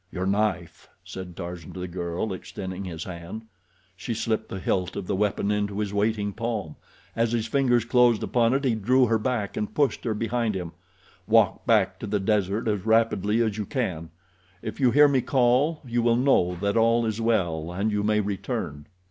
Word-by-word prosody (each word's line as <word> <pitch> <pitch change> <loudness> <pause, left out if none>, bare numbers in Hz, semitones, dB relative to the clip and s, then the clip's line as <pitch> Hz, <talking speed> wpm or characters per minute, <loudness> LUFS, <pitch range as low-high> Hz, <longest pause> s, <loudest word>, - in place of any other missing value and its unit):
"Your 95 0 -3
knife," 100 -3 -1 0.2
said 90 -2 -8
Tarzan 85 -2 -7
to - - -8
the 90 - -4
girl, 85 +3 -3
extending 95 +1 -6
his 85 -3 -5
hand. 90 +5 -7 0.5
She 115 +5 -4
slipped 110 0 -2
the - - -5
hilt 90 -1 -1
of 95 - -4
the 95 - -1
weapon 105 0 0
into 100 -1 -1
his 105 -1 -2
waiting 105 0 0
palm. 110 -8 -3 0.4
As 115 0 +1
his 115 -2 0
fingers 120 -2 +2
closed 120 -2 +3
upon 120 +1 +2
it 135 - 0
he 130 -4 +2
drew 125 +5 +3
her 115 -1 +1
back 110 -3 -2
and 105 - -4
pushed 140 -5 +1
her 110 -3 0
behind 115 0 -1
him. 90 -3 -4 0.6
"Walk 110 +2 +3
back 95 -5 +3
to 110 - -5
the 105 0 0
desert 105 +1 0
as 105 -3 0
rapidly 110 0 +2
as 110 -1 -2
you 105 - -2
can. 90 - -3 0.5
If - - -6
you 130 -3 +4
hear 145 +5 +6
me 135 -3 +2
call 130 +5 +2
you 120 -1 0
will 115 0 +3
know 120 -9 +3
that 100 0 0
all 115 +1 +3
is 110 0 -2
well, 85 -8 0
and 100 +5 -1
you 105 0 0
may 105 0 +2
return." 90 -7 -4
105 Hz, 195 wpm, -25 LUFS, 95-115 Hz, 0.6 s, hear